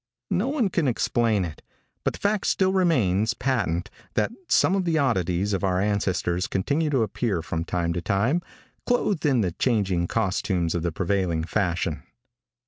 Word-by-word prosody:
No 200 +8 +1
one 270 -7 +1
can 170 -5 0
explain 115 -4 +1
it, 80 -2 -8 0.4
but - - 0
the - - -9
fact 205 0 0
still 190 -1 +2
remains 115 - +2
patent 105 -8 -1 0.2
that - - +1 0.2
some 185 - +4
of 195 - +1
the 165 -2 +1
oddities 100 - +1
of 95 - -1
our 95 -1 +1
ancestors 95 -3 0
continue 145 - 0
to 135 -5 +2
appear 105 -4 -1
from 80 0 -3
time 85 -1 -1
to 85 - -2
time, 110 - +1 0.5
clothed 205 -10 +1
in 130 -5 +3
the 90 -4 0
changing 95 -5 0
costumes 95 -5 0
of 85 - -1
the 85 0 -1
prevailing 90 -2 0
fashion. 85 0 -1
100 Hz, 165 wpm, -25 LUFS, 90-140 Hz, 0.5 s, some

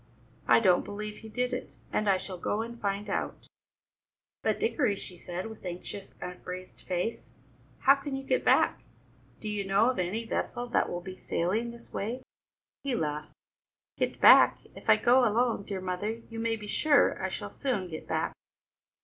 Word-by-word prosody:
I - - +7
don't 185 -5 +4
believe 210 +1 -6
he 220 - -10
did 250 +3 -1
it, 250 - -5 0.2
and 215 -1 +2
I 195 - +5
shall 185 -1 -6
go 210 +5 0
and 235 +1 -9
find 200 +1 -1
out." - - -3 1.0
"But, - - +1
Dickory," 285 - +2
she 185 - -7
said, 175 +1 -5
with 220 -1 -9
anxious, 180 +2 -7
upraised 180 +1 -7
face, 180 +5 -3 0.5
"how 275 - +8
can 275 0 -4
you 270 - -4
get - - +1
back? - - +4 0.6
Do 215 - -6
you 210 -1 -1
know 200 +5 +4
of 255 - -5
any 200 +6 -1
vessel 240 +2 -2
that - - +2
will 175 - -3
be 185 +1 -8
sailing 210 +8 -1
this 235 0 -12
way?" 240 +5 -3 0.6
He 275 -3 0
laughed. 150 -5 -3 0.6
"Get - - -1
back? - - +8 0.2
If - - -8
I - - +8
go 245 +2 +5
alone, 230 -2 +2
dear 195 -2 -4
mother, 205 +5 -3
you 225 - -5
may 225 0 +1
be 210 -1 -8
sure 290 +7 +3
I - - 0
shall - - -5
soon 240 -9 -1
get 160 -2 -7
back. - - -1
210 Hz, 180 wpm, -29 LUFS, 185-235 Hz, 1.0 s, how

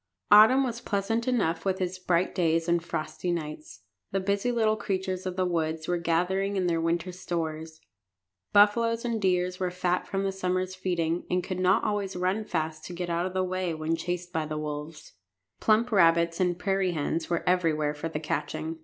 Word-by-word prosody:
Autumn 220 +6 +8
was 235 -2 -3
pleasant 225 +2 -1
enough 170 -10 +1
with 190 0 0
its 185 0 -2
bright 180 -1 +1
days 165 -2 +1
and 170 -1 +2
frosty 170 +1 -3
nights. 155 -9 -5 0.3
The 195 - -1
busy 200 +5 0
little 220 -2 +2
creatures 190 -2 -3
of 185 - -4
the 185 0 +1
woods 160 -2 -1
were 175 -1 0
gathering 180 +4 0
in 190 -2 0
their 165 -2 +1
winter 170 +2 -1
stores. 160 -3 -4 0.7
Buffaloes 230 +3 +4
and 230 -2 -1
deer 180 -1 +2
were 185 -1 0
fat 180 0 -1
from 195 0 -2
their 195 - 0
summer's 185 -1 -1
feeding, 175 -2 -1
and 180 0 +1
could 185 -1 -4
not 185 +3 +3
always 205 -2 -1
run 185 +4 0
fast 160 -4 -3
to 180 - -7
get 175 0 -4
out 170 +2 0
of 185 - -8
the 185 - +2
way 185 -2 -2
when 155 +1 -1
chased 175 +1 -4
by 160 -1 -1
the 155 0 -4
wolves. 150 +1 -6 0.5
Plump 225 +3 +3
rabbits 170 -3 +4
and 180 -2 +1
prairie 195 -1 0
hens 160 +2 -2
were 170 -1 -1
everywhere 160 -5 +2
for 150 +2 -5
the 150 - -3
catching. 160 +1 -3
180 Hz, 190 wpm, -27 LUFS, 165-195 Hz, 0.7 s, Autumn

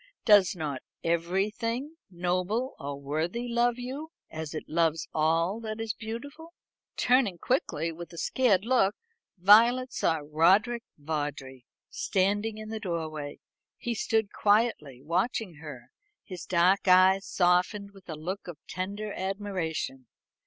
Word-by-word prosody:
"Does 205 -4 +6
not 150 -6 -4 0.2
everything 210 - -1
noble 185 +8 -1
or 140 0 -5
worthy 160 - -2
love 240 0 +2
you, 265 +6 -6 0.2
as 160 -1 -6
it - - -4
loves 165 -1 +1
all 165 +6 +1
that 220 -1 -5
is 225 -1 -2
beautiful?" 285 +10 -8 0.4
Turning 245 -7 +3
quickly, 165 - -1
with 170 +2 -9
a 170 - -11
scared 210 -2 +2
look, 230 -5 +3 0.4
Violet 235 +7 +5
saw 160 -2 +1
Roderick 190 +10 +3 0.2
Vawdrey 145 -4 -5 0.2
standing 205 +3 0
in 215 0 -8
the 220 0 -4
doorway. 160 -7 -4 0.4
He 240 - -3
stood 220 -1 0
quietly 205 - +1
watching 180 - -1
her, 145 -6 -10 0.3
his 180 -5 -8
dark 185 +3 +3
eyes 185 +1 +5
softened 180 +3 +1
with 195 -2 -18
a 160 - -4
look 180 +6 -5
of 175 -4 -7
tender 200 +4 -4
admiration. 185 - -3
190 Hz, 130 wpm, -28 LUFS, 160-220 Hz, 0.4 s, Does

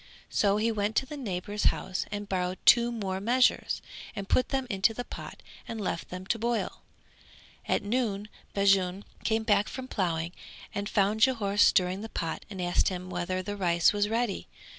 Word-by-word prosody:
So 200 -1 +3
he 225 +2 +2
went 210 0 -1
to 265 - +2
a - - -4
neighbour's 205 -5 -3
house 185 - 0
and 205 0 -4
borrowed 185 -1 -1
two 240 0 +7
more 195 -5 -3
measures, 250 +4 +2 0.3
and 195 -1 -5
put 255 - +2
them 265 -1 0
into 200 +1 +2
the 245 - -3
pot - - -9 0.2
and 225 - -5
left 170 -4 -3
them 180 +1 -7
to 230 +4 0
boil. 235 +1 -1 0.9
At - - +1
noon 210 -2 -1 0.3
Bajun 195 -1 +3 0.2
came 220 0 +1
back 205 -2 +3
from 260 -1 -6
ploughing 170 -6 -1 0.4
and 200 +1 -3
found 210 +1 +2
Jhore 215 -5 +2
stirring 190 -2 +4
the 225 - -6
pot 165 -6 -4
and 195 -3 -7
asked 175 -1 +2
him 185 -1 -3
whether 185 +1 -2
the 205 +2 -4
rice 170 -3 +3
was 205 0 +1
ready. 230 -2 -1
205 Hz, 180 wpm, -29 LUFS, 185-225 Hz, 0.9 s, two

